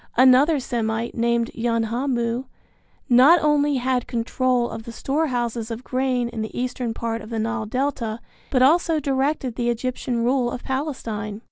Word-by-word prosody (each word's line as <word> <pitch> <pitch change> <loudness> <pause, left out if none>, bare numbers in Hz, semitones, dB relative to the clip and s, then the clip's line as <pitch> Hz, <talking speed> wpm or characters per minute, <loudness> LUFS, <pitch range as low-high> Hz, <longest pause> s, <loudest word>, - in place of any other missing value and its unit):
Another 265 +5 +6
Semite 230 -2 -2
named 235 0 0
Yanhamu 235 +1 -1 0.6
not 270 +7 +7
only 295 -1 +3
had 255 -1 0
control 245 +1 0
of 225 - -6
the 235 - -9
storehouses 240 -4 -2
of 230 +2 -6
grain 255 -2 0
in 230 -2 -5
the 220 - -5
eastern 250 -1 -2
part 230 -1 -3
of 215 - -10
the 230 - -3
Nile 225 0 -2
Delta, 240 -2 -2 0.3
but 255 -2 +3
also 325 +3 +4
directed 270 -2 -1
the 240 0 0
Egyptian 240 0 -2
rule 250 0 +2
of 245 - -6
Palestine. 230 -7 -4
245 Hz, 150 wpm, -23 LUFS, 230-265 Hz, 0.6 s, not